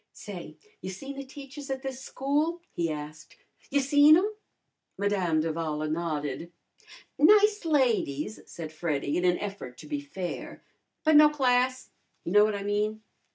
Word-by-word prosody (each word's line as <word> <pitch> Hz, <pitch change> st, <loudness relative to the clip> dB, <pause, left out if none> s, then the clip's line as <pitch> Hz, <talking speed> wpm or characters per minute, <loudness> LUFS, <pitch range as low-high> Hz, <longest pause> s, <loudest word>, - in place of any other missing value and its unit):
"Say, -, -, -9 dB, 0.3 s
you -, -, -5 dB
seen 270 Hz, +9 st, -7 dB
the 275 Hz, -, -6 dB
teachers 275 Hz, +1 st, -10 dB
at 265 Hz, 0 st, -3 dB
this 265 Hz, -1 st, -5 dB
school?" 295 Hz, +7 st, -1 dB
he 170 Hz, -1 st, -1 dB
asked. 150 Hz, 0 st, -7 dB, 0.3 s
"You 285 Hz, -, +2 dB
seen 290 Hz, +3 st, +6 dB
'em?" 410 Hz, +4 st, 0 dB, 0.6 s
Madame 190 Hz, -6 st, +1 dB
d'Avala 155 Hz, -1 st, -2 dB
nodded. 160 Hz, -1 st, -3 dB, 0.7 s
"Nice 415 Hz, +6 st, +5 dB
ladies," 230 Hz, -, +1 dB
said 160 Hz, -2 st, -7 dB
Freddy 150 Hz, -3 st, -2 dB
in 180 Hz, -, 0 dB
an 180 Hz, 0 st, +3 dB
effort 195 Hz, -12 st, -6 dB
to -, -, -11 dB
be 295 Hz, -1 st, -3 dB
fair. 190 Hz, -12 st, -6 dB, 0.4 s
"But 315 Hz, -1 st, +6 dB
no 300 Hz, 0 st, +8 dB
class 255 Hz, -3 st, +1 dB, 0.3 s
you 170 Hz, -, -3 dB
know 210 Hz, +2 st, +7 dB
what 215 Hz, -1 st, +1 dB
I 200 Hz, -, -4 dB
mean. 210 Hz, +1 st, -1 dB
215 Hz, 155 wpm, -28 LUFS, -, 0.7 s, no